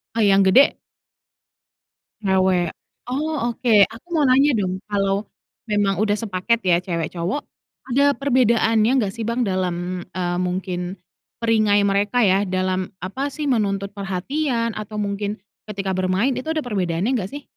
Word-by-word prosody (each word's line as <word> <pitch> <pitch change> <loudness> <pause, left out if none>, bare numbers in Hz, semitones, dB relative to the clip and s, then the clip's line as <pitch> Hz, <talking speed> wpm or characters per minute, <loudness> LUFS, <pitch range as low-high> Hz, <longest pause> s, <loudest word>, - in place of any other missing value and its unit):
Oh, 225 - +1
yang 195 0 +5
gede? 245 +9 +5 1.4
Cewek. 185 -3 +1 0.3
Oh 295 +5 -2 0.2
oke, 240 -3 +1
aku 230 +10 -14
mau 305 -4 +2
nanya 275 +3 +5
dong, 185 -1 -1
kalau 200 0 0 0.5
memang 200 -2 +2
udah 205 -1 +2
sepaket 225 +2 0
ya 175 - +5
cewek-cowok, 170 - -2 0.5
ada 275 +3 +3
perbedaannya 235 -5 +2
enggak 200 -2 -2
sih, 230 - -4
Bang, 235 +2 -1
dalam, 180 -1 -2
eee, 175 -1 -2
mungkin 180 0 -3 0.4
perangai 215 -3 +3
mereka 200 +4 +1
ya 195 -1 +3
dalam 185 -1 -1
apa 265 +10 -3
sih, 295 0 -4
menuntut 200 -4 0
perhatian 230 - -2
atau 215 0 -5
mungkin 205 0 -3 0.3
ketika 195 -3 -3
bermain 185 +8 +1
itu 255 - -5
ada 315 - 0
perbedaannya 190 - -1
enggak 195 -2 -3
sih? 285 -1 -7
200 Hz, 140 wpm, -22 LUFS, 185-235 Hz, 1.4 s, yang